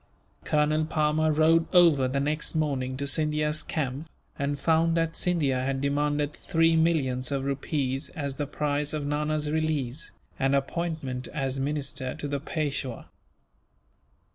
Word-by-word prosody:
Colonel 155 Hz, +1 st, +2 dB
Palmer 155 Hz, 0 st, +2 dB
rode 160 Hz, +2 st, +4 dB
over 160 Hz, -7 st, +6 dB
the 135 Hz, +2 st, -1 dB
next 150 Hz, +3 st, -1 dB
morning 135 Hz, -4 st, -1 dB
to 140 Hz, -, -2 dB
Scindia's 150 Hz, +1 st, 0 dB
camp, 145 Hz, +1 st, -3 dB, 0.3 s
and 140 Hz, 0 st, -1 dB
found 165 Hz, +1 st, +3 dB
that 165 Hz, 0 st, 0 dB
Scindia 145 Hz, -8 st, +1 dB
had 135 Hz, 0 st, -1 dB
demanded 145 Hz, +1 st, 0 dB
three 165 Hz, 0 st, +2 dB
millions 145 Hz, -6 st, +1 dB
of 135 Hz, -1 st, -1 dB
rupees 140 Hz, 0 st, -2 dB
as 140 Hz, -4 st, -3 dB
the 145 Hz, -, -2 dB
price 145 Hz, 0 st, -1 dB
of 150 Hz, -2 st, -2 dB
Nana's 150 Hz, +1 st, -1 dB
release, 155 Hz, -4 st, -1 dB, 0.3 s
and 135 Hz, 0 st, +2 dB
appointment 140 Hz, -3 st, -2 dB
as 135 Hz, -2 st, -1 dB
minister 140 Hz, -2 st, -2 dB
to 145 Hz, -, -5 dB
the 140 Hz, 0 st, -2 dB
Peishwa. 140 Hz, -5 st, -3 dB
150 Hz, 140 wpm, -27 LUFS, 135-155 Hz, 0.3 s, over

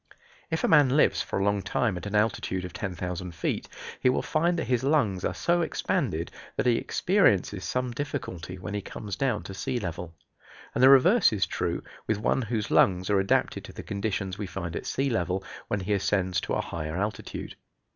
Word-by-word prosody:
If 160 Hz, -1 st, -1 dB
a -, -, +4 dB
man 145 Hz, -3 st, +5 dB
lives -, -, +4 dB
for -, -, -3 dB
a 95 Hz, -, +1 dB
long 100 Hz, 0 st, +2 dB
time 110 Hz, +1 st, 0 dB
at 90 Hz, -, -5 dB
an 105 Hz, -, -3 dB
altitude 105 Hz, -3 st, 0 dB
of 90 Hz, -, -8 dB
10,000 90 Hz, -1 st, -4 dB
feet 85 Hz, -, -2 dB, 0.3 s
he 125 Hz, -, +4 dB
will 125 Hz, -, +1 dB
find 170 Hz, +3 st, +1 dB
that 165 Hz, -, 0 dB
his 125 Hz, -1 st, 0 dB
lungs 130 Hz, -, +2 dB
are -, -, -1 dB
so 175 Hz, 0 st, +2 dB
expanded 85 Hz, -, -1 dB, 0.2 s
that -, -, 0 dB
he 120 Hz, -2 st, +4 dB
experiences 105 Hz, -, +2 dB
some 125 Hz, -1 st, -1 dB
difficulty 115 Hz, -, -5 dB
when 100 Hz, +3 st, -6 dB
he 105 Hz, -, -2 dB
comes 100 Hz, 0 st, -6 dB
down 125 Hz, -4 st, 0 dB
to 95 Hz, -, -7 dB
sea 125 Hz, +6 st, -2 dB
level. 85 Hz, -4 st, -5 dB, 0.6 s
And -, -, 0 dB
the 130 Hz, -, +9 dB
reverse 175 Hz, -, +6 dB
is 105 Hz, -3 st, +1 dB
true -, -, -2 dB, 0.2 s
with 110 Hz, -, +1 dB
one 110 Hz, +5 st, +1 dB
whose 110 Hz, -3 st, -2 dB
lungs 95 Hz, +1 st, +3 dB
are 100 Hz, -, +4 dB
adapted 95 Hz, -, +1 dB
to -, -, -11 dB
the -, -, -8 dB
conditions 100 Hz, -2 st, -3 dB
we 105 Hz, -, -3 dB
find 85 Hz, -3 st, -5 dB
at -, -, -4 dB
sea 135 Hz, 0 st, 0 dB
level, 95 Hz, -3 st, -1 dB, 0.2 s
when 100 Hz, -, -1 dB
he 100 Hz, +3 st, -1 dB
ascends 95 Hz, -2 st, +1 dB
to -, -, -3 dB
a -, -, +1 dB
higher 80 Hz, 0 st, -4 dB
altitude. 105 Hz, +1 st, -4 dB
105 Hz, 205 wpm, -27 LUFS, 90-125 Hz, 0.6 s, the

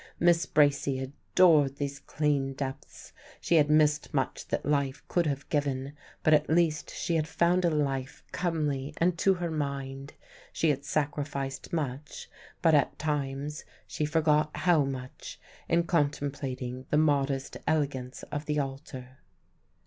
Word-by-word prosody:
Miss 170 Hz, -1 st, +3 dB
Bracy 140 Hz, -2 st, +3 dB
adored 145 Hz, +2 st, +3 dB
these 140 Hz, 0 st, -4 dB
clean 140 Hz, -2 st, 0 dB
depths. 135 Hz, +1 st, -7 dB, 0.3 s
She 170 Hz, -, +2 dB
had 150 Hz, -1 st, +4 dB
missed 150 Hz, -1 st, +3 dB
much 135 Hz, -2 st, -1 dB
that -, -, -2 dB
life 140 Hz, -2 st, 0 dB
could 175 Hz, -2 st, +1 dB
have 140 Hz, -1 st, -3 dB
given; 140 Hz, -2 st, -1 dB, 0.3 s
but 155 Hz, -, +5 dB
at 150 Hz, 0 st, +3 dB
least 160 Hz, -1 st, +2 dB
she 170 Hz, -, -1 dB
had 155 Hz, -1 st, -1 dB
found 170 Hz, +3 st, +2 dB
a -, -, +4 dB
life 135 Hz, -4 st, -2 dB
comely 150 Hz, -5 st, -2 dB
and 175 Hz, +1 st, +2 dB
to 195 Hz, -1 st, +4 dB
her 175 Hz, -2 st, -3 dB
mind. 140 Hz, -2 st, -4 dB, 0.4 s
She 160 Hz, -, +2 dB
had 140 Hz, 0 st, -4 dB
sacrificed 145 Hz, -2 st, -2 dB
much; 145 Hz, -3 st, -4 dB, 0.3 s
but 165 Hz, -2 st, +5 dB
at 145 Hz, -3 st, +3 dB
times 145 Hz, -1 st, -3 dB, 0.2 s
she 150 Hz, -, -2 dB
forgot 150 Hz, 0 st, +2 dB
how 170 Hz, -6 st, +3 dB
much 130 Hz, -1 st, -7 dB, 0.3 s
in 170 Hz, +1 st, +3 dB
contemplating 140 Hz, -5 st, -2 dB
the 150 Hz, -, +2 dB
modest 140 Hz, -3 st, +1 dB
elegance 135 Hz, -5 st, -1 dB
of 150 Hz, 0 st, -4 dB
the 150 Hz, 0 st, 0 dB
altar. 135 Hz, -2 st, -5 dB
145 Hz, 140 wpm, -29 LUFS, 135-155 Hz, 0.4 s, but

